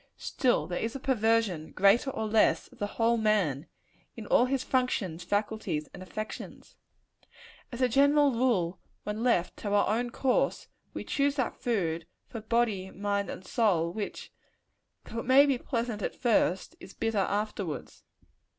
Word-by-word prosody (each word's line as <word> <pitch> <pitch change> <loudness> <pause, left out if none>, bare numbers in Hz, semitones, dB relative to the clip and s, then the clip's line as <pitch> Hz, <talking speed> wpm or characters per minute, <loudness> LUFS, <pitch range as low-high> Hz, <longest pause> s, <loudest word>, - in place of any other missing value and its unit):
Still 250 -3 0
there 175 - -3
is 225 +2 -3
a - - -4
perversion, 225 - +1
greater 200 +8 +4
or 220 -4 -3
less, 215 0 +2
of - - -20
the 205 - -1
whole 235 +1 +3
man 195 - +1 0.5
in 225 - -8
all 240 - +4
his 260 0 -1
functions, 205 -10 -1
faculties 205 -5 -2
and - - -10
affections. 215 +3 -7 1.0
As 245 +1 -6
a 255 - +5
general 285 +3 +4
rule, 230 -8 +1 0.2
when 210 +1 -4
left 230 -8 +1
to 205 - -4
our 205 - +3
own 240 +1 -1
course, 255 +1 0 0.3
we - - -4
choose 280 0 0
that 260 -4 -1
food, 170 -8 -2 0.2
for 225 - -8
body, 220 -4 0
mind 200 +1 -2
and 185 - -7
soul, 180 -7 +1
which, 210 0 -6 0.7
though 230 - -5
it - - -5
may 270 +2 +7
be 275 -4 +1
pleasant 230 -4 -3
at - - -3
first, 210 -6 +1
is 195 - -12
bitter 225 -2 -1
afterwards. 200 -4 -3
220 Hz, 160 wpm, -29 LUFS, 190-245 Hz, 1.0 s, may